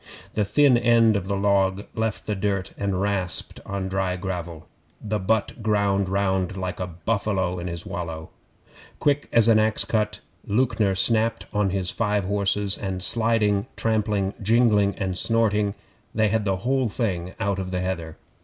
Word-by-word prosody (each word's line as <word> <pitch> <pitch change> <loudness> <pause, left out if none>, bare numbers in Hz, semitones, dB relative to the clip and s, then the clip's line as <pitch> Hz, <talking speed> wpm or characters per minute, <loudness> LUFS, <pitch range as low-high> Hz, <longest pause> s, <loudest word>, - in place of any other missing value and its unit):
The 105 - +1
thin 135 +1 +4
end 115 -2 +4
of 95 -2 -2
the 100 - 0
log 100 0 +1
left 110 -2 -2
the 105 - -1
dirt 100 -1 -2
and 100 -2 -1
rasped 95 -3 -2
on 95 -1 -3
dry 95 -1 -1
gravel. 85 -3 -5 0.3
The 105 0 -2
butt 110 +4 -1
ground 100 -3 +1
round 95 -1 0
like 90 -1 -4
a 90 - -2
buffalo 95 0 -1
in 85 - -5
his 85 -1 -5
wallow. 80 -2 -5 0.7
Quick 145 0 +1
as 115 -1 +5
an 110 -1 +6
axe 110 0 +2
cut, 105 -1 -1 0.3
Lewknor 105 -3 +1
snapped 115 +3 +2
on 105 -2 +2
his 95 -1 -1
five 105 -3 0
horses, 100 0 0
and 95 -2 -3
sliding, 110 -3 +2
trampling, 105 -3 0
jingling, 105 -2 +3
and 95 -2 -2
snorting, 105 -3 +1 0.4
they 110 -1 +3
had 110 0 0
the 95 -1 +1
whole 130 -2 +1
thing 95 -5 -3
out 100 -1 0
on 95 -1 -4
the 90 -1 -2
heather. 85 -4 -4
100 Hz, 165 wpm, -24 LUFS, 95-110 Hz, 0.7 s, an